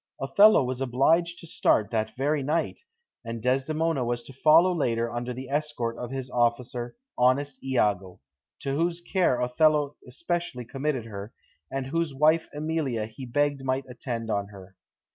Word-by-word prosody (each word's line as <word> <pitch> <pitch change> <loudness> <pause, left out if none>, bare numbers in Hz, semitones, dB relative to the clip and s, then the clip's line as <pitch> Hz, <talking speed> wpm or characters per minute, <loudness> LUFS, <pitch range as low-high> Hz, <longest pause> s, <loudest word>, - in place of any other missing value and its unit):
Othello 170 +9 +6
was 130 +1 -3
obliged 160 +7 +2
to - - -11
start 110 -9 +1
that 110 -1 -1
very 145 +2 +1
night, 155 +4 -1 0.4
and 115 0 -5
Desdemona 135 +4 0
was 120 0 -2
to 135 - -12
follow 160 +7 +5
later 115 -7 0
under 120 +1 -3
the 130 +2 -6
escort 140 -5 -2
of 120 - -5
his 130 -1 -4
officer, 120 +1 0 0.2
"honest 130 +2 +2
Iago," 105 -8 0 0.4
to 135 - -2
whose 170 +3 0
care 175 -7 +1
Othello 145 +3 +2
especially 170 -1 -3
committed 135 0 -2
her, 105 -1 -8 0.3
and 135 -1 -3
whose 160 +1 -2
wife 155 +3 +3
Emilia 150 -7 -2
he 110 +4 -9
begged 145 +2 0
might 130 0 -1
attend 120 -2 -5
on 100 -1 -1
her. 95 -2 -13
130 Hz, 155 wpm, -27 LUFS, 120-150 Hz, 0.4 s, Othello